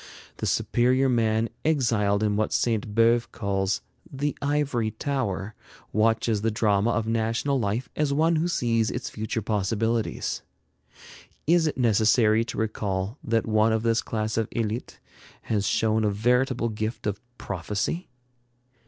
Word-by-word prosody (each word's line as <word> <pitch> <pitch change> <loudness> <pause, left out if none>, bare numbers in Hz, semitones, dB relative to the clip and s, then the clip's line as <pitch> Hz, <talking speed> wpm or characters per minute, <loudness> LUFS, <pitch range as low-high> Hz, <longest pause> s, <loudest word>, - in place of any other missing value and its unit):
The - - -3
superior 130 +3 +2
man 115 -2 +1
exiled 115 -9 +2
in 105 -1 +1
what 110 +1 0
Sainte 105 -3 0
Beuve 115 +1 +3
calls 100 -3 -1 0.3
"the 145 +1 -2
ivory 140 -6 0
tower" 110 -6 -3 0.4
watches 110 0 +2
the 115 - +1
drama 105 0 +2
of 115 -1 0
national 115 +5 0
life 115 +3 -1
as 150 -2 0
one 160 +3 +3
who 165 +3 +1
sees 115 -9 +1
its - - -4
future 110 0 -3
possibilities. 110 +2 -1 1.0
Is 165 0 +4
it 150 - -2
necessary 110 -1 +4
to - - -6
recall 105 +1 -2
that 115 0 +1
one 110 0 +3
of 110 0 0
this 115 0 +2
class 110 0 -3
of 110 -2 0
élite 115 0 -3 0.5
has 105 -2 0
shown 110 0 +2
a 105 - +2
veritable 120 +3 +1
gift 110 +1 -4
of 105 -1 -2 0.2
prophecy? 100 - -3
115 Hz, 140 wpm, -26 LUFS, 105-120 Hz, 1.0 s, Is